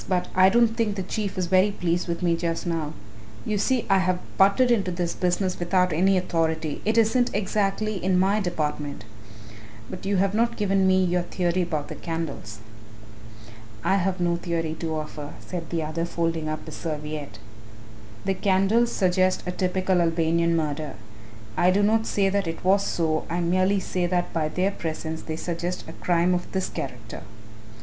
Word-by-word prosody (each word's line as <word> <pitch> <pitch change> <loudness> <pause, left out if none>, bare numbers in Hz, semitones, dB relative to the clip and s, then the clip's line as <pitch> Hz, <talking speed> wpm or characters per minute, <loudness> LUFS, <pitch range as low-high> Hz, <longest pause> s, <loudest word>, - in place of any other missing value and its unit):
"but 180 -2 0
I 185 0 +6
don't 235 +2 +4
think 225 -3 0
the 190 - -3
Chief 200 +1 -3
is 185 - 0
very 185 +3 +4
pleased 175 -3 -1
with 170 +1 -3
me 170 -1 +3
just 165 0 -2
now. 165 -3 -2 0.5
You 210 -1 0
see 250 +2 +1
I 195 -1 +4
have 185 -1 +1 0.2
butted 200 +6 +4
into 200 -6 +2
this 175 -1 -2
business 185 +1 0
without 180 0 +2
any 190 +4 +3
authority 160 -4 -1
it 220 +2 +1
isn't 235 +2 +3
exactly 205 0 -1
in 185 0 +2
my 195 +3 +3
department. 150 - -3 0.9
But 185 - -7
you 200 -1 +2
have 195 +1 +2
not 235 +2 +1
given 195 -2 +2
me 185 0 +4
your 180 0 +1
theory 175 0 -1
about 155 -4 -2
the - - -6
candles." 165 -10 -5 1.3
"I 195 - +3
have 190 0 0
no 175 -1 +1
theory 165 -2 -2
to 160 -2 -2
offer," 150 -1 -6
said 175 -3 -6
the 165 -2 -1
other, 155 +2 -2
folding 165 -2 -1
up 155 - -4
his 155 - -8
serviette; 150 -6 -5 0.9
"the 195 - +2
candles 195 +5 +2
suggest 185 -1 +2
a 180 - -2
typical 185 0 +1
Albanian 165 0 +2
murder. 150 -2 -2 0.6
I 175 - +4
do 200 +2 +3
not 220 +2 +2
say 200 -1 +2
that 200 -2 0
it 165 0 -5
was 195 +2 +4
so, 160 -4 0
I 170 +1 -1
merely 185 +3 +2
say 180 -1 -1
that 175 0 -1
by 160 -2 0
their 185 +4 0
presence 160 -2 -4
they 160 - -5
suggest 175 +2 -4
a - - -8
crime 175 0 +1
of 180 0 -3
this 190 -1 -1
character." 120 -5 -6
180 Hz, 180 wpm, -25 LUFS, 165-195 Hz, 1.3 s, I